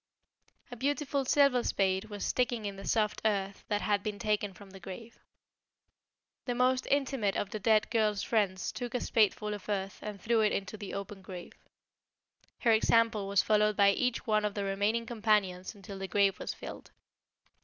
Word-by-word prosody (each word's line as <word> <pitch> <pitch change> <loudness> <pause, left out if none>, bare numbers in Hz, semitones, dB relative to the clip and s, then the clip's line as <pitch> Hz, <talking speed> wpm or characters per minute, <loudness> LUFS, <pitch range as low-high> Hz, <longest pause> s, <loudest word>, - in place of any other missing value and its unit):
A - - -5
beautiful 280 +2 -1
silver 275 -2 +4
spade 190 0 +1
was 205 -2 -5
sticking 240 -3 0
in 200 -1 -4
the 195 - -9
soft 215 -2 +1
earth 200 -2 -1
that 205 -1 0
had 205 -1 +1
been 210 0 -4
taken 210 -1 0
from 195 +1 -14
the 195 - -11
grave. 195 +5 -10 1.3
The 245 - -1
most 255 +1 +2
intimate 270 -7 +1
of 200 - -2
the 215 - -4
dead 215 0 +3
girls 215 -3 +1
friends 200 -5 0
took 245 -1 -5
a - - +1
spadeful 210 -2 +1
of 205 0 -8
earth 195 -1 -2
and 210 -2 -6
threw 225 +3 +2
it 215 - +2
into 200 +2 -3
the 205 -2 -7
open 200 0 -6
grave. 185 -2 -9 1.1
Her 235 - +4
example 225 -1 +3
was 200 0 +3
followed 210 -1 +2
by 200 -1 +6
each 250 +3 -1
one 215 -1 +2
of 210 -1 -1
the 200 - -2
remaining 205 +4 0
companions 210 -5 0
until 200 -1 -9
the 195 - -4
grave 195 +1 +2
was - - -3
filled. - - -9
210 Hz, 180 wpm, -31 LUFS, 200-230 Hz, 1.3 s, by